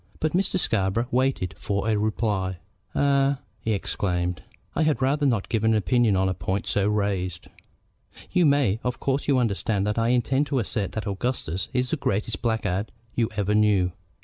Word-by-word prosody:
But 155 - 0
Mr. 185 +2 +1
Scarborough 110 - +1
waited 125 -8 +1
for 100 +1 -1
a 110 - +3
reply. 105 -3 0 0.4
"Eh?" 140 0 +3 0.2
he 110 +1 -1
exclaimed. 90 -3 -1 0.3
"I - - +1
had 155 -6 +2
rather 140 +2 +2
not 115 -7 0
give 110 -2 -1
an 110 0 +4
opinion 110 0 +3
on 95 0 +2
a 95 - +1
point 95 +3 -2
so 100 0 +1
raised." 100 -4 -1 0.9
"You 180 -3 +4
may. 135 -8 +3
Of 125 0 -2
course 135 +1 -1
you 140 -2 +4
understand 105 -3 0
that 105 +2 0
I 115 - +2
intend 130 +4 +2
to 140 - -1
assert 105 -4 -1
that 110 - -3
Augustus 100 -4 -2
is 125 -1 0
the 160 - +1
greatest 105 -4 -1
blackguard 110 -4 -1 0.2
you 115 -2 +1
ever 105 0 +1
knew. 105 -4 +3
110 Hz, 175 wpm, -25 LUFS, 100-130 Hz, 0.9 s, an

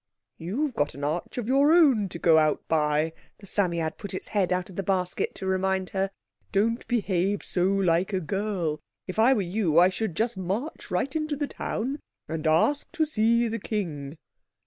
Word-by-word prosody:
"You've 250 - -2
got 145 -8 -1
an 140 - -7
arch 155 - -2
of 235 -3 -3
your 275 +4 +4
own 260 - +4
to 170 - -6
go 165 -1 +5
out 155 -1 +1
by," 155 0 +1 0.2
the 200 - -14
Psammead 170 -5 -1
put 200 -2 -6
its - - -6
head 195 -4 +1
out 180 -1 0
of - - -13
the 195 - -1
basket 185 -2 -1
to - - -6
remind 190 0 0
her. 195 0 0 0.4
"Don't 225 +4 +1
behave 200 -4 0
so 180 -1 0
like 190 -2 +2
a 190 - 0
girl. 185 -3 -2 0.3
If - - -5
I 240 +4 +6
were 205 - 0
you 175 -3 0
I 180 +2 +7
should 190 -2 -3
just 225 +1 0
march 200 - -4
right 260 - -1
into 310 -1 -1
the 290 +1 -1
town 275 +1 -3 0.3
and 160 0 -3
ask 170 - +2
to 315 - +2
see 235 -3 +2
the 230 +1 -3
king." 160 -9 -4
190 Hz, 190 wpm, -26 LUFS, 170-225 Hz, 0.4 s, I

